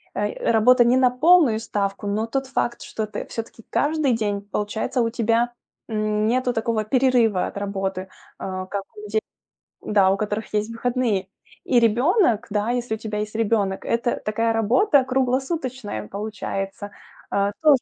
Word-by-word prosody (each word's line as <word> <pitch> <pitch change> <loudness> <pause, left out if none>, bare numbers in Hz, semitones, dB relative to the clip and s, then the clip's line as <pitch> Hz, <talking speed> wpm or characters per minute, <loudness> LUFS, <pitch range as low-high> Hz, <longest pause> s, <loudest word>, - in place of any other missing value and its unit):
э, 205 +2 -1
работа 240 +3 +5
не 245 +2 +4
на 255 -1 +5
полную 280 -3 +4
ставку, 200 -2 -3
но 210 +2 0
тот 270 +3 -2
факт, 240 -2 -2
что 220 - -4
ты - - -5
всё-таки 225 0 -7
каждый 295 -3 +1
день, 205 -3 -1
получается, 210 +4 -2
у 230 - +1
тебя, 235 +1 +1 0.3
м, 215 -1 0
нету 250 +1 +1
такого 225 -1 0
перерыва 240 -4 +2
от - - -8
работы, 195 -2 -3 0.3
а, 185 -1 -4
как 195 +1 -4
у - - -8
детей, 215 +1 0 0.6
да, 200 -3 +3
у 195 - +1
которых 210 +1 -3
есть 210 +1 0
выходные. 230 -5 -1 0.4
И 245 -3 +3
ребенок, 235 - +3
да, 210 +3 0
если 245 -2 -1
у - - -8
тебя 215 -1 -4
есть 215 +1 -4
ребенок, 205 -3 0
это 235 +1 0
такая 225 +2 +1
работа 255 - +3
круглосуточная 260 - -2
получается. 205 - -5 0.4
А, 200 0 +1
тоже 300 -3 +6
225 Hz, 160 wpm, -23 LUFS, 205-245 Hz, 0.6 s, тоже